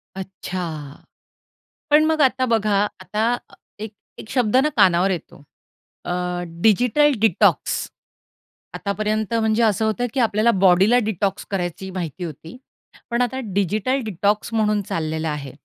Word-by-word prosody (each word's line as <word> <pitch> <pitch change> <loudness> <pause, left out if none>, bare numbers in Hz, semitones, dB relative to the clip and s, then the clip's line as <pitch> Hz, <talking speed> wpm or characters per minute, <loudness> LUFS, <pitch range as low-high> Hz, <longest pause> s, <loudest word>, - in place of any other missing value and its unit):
अच्छा. 180 -6 -6 0.9
पण 300 +1 +5
मग 315 -1 +1
आता 260 -1 +3
बघा, 220 -4 +1 0.3
आता 215 +6 0 0.4
एक 215 0 -7 0.3
एक 215 - -10
शब्द 250 -2 +2
ना 280 +4 +3
कानावर 185 +1 +4
येतो. 165 -4 -6 0.6
अ, 175 - -2 0.5
डिजिटल 245 +8 +4
डिटॉक्स. 215 -5 +2 0.9
आतापर्यंत 215 +1 -2
म्हणजे 220 0 +2
असं 220 0 +2
होतं, 220 +3 0
की 270 - -1
आपल्याला 225 -1 +3
बॉडीला 190 +5 +5
डिटॉक्स 200 -2 -2
करायची 190 0 -3
माहिती 180 -1 -5
होती. 165 - -8 0.5
पण 235 +1 +1
आता 250 +2 -1
डिजिटल 210 +7 0
डिटॉक्स 210 +3 -1
म्हणून 210 -2 +1
चाललेलं 160 0 -2
आहे, 145 -3 -4
210 Hz, 125 wpm, -21 LUFS, 180-230 Hz, 0.9 s, पण